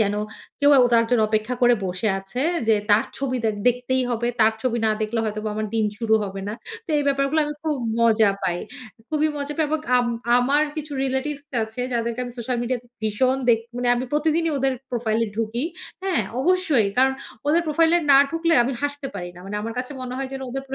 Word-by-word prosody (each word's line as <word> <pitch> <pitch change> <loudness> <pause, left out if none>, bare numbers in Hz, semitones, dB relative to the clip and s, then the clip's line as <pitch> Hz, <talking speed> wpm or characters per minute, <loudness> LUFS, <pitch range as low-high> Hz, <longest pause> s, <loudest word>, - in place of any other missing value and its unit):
যেন 205 -1 +2 0.5
কেউ 285 0 +6 0.2
তার 230 0 +5
জন্য 235 -3 +3
অপেক্ষা 215 +3 0
করে 245 0 +6
বসে 185 +4 -1
আছে 195 +6 -5 0.3
যে 220 - +6 0.2
তার 210 +2 +5
ছবি 265 -2 -1
দে 220 - +3 0.2
দেখতেই 250 +1 0
হবে। 235 0 -1
তার 220 0 +5
ছবি 235 -2 0
না 220 - +3
দেখলে 225 +1 -1
হয়তো 215 0 -3
বা - - -1
আমার 215 0 -2
দিন 220 -1 +2
শুরু 225 -1 +2
হবে 195 0 -6
না। 210 - -3 0.3
তো - - -35
এই - - +1
ব্যাপারগুলো 275 +3 +1
আমি 295 - -3
খুব 310 -2 0 0.3
মজা 220 -3 +4
পাই। 175 0 0 0.5
খুবই 310 0 +1
মজা 285 0 -3
পাই 315 -2 +1
এবং 315 0 0 0.2
আম 245 -1 +2 0.3
আমার 280 +4 +3
কিছু 300 -1 -5
রিলেটিভস 275 +2 -2 0.2
আছে 220 +3 -5
যাদেরকে 235 +1 -1
আমি 245 - -7
সোশ্যাল 240 +1 -2
মিডিয়া 250 +1 -1
তে - - -23 0.2
ভীষণ 255 +5 +1
দেখ 225 -1 +5 0.2
মানে 245 0 0
আমি 245 - -2
প্রতিদিনই 320 +2 +1
ওদের 270 0 +1 0.2
প্রোফাইল 225 -2 0
এ - - -6
ঢুকি। 225 +3 -1 0.4
হ্যাঁ, 370 - +1 0.2
অবশ্যই। 325 - +3
কারণ 265 +1 +4 0.4
ওদের 335 +3 +3
প্রোফাইল 325 +2 +3
এ - - +4
না 275 - +9
ঢুকলে 330 0 +1
আমি 260 +3 -1
হাসতে 285 -1 -2
পারি 175 0 -5
না। 175 - -13
মানে 210 +1 -4
আমার 225 +2 -4
কাছে 250 +3 -4
মনে 255 0 -5
হয় 270 -1 -3
যেন 270 - -5
ওদের 270 +1 -4
প্র 270 - -4
250 Hz, 215 wpm, -23 LUFS, 220-285 Hz, 0.5 s, না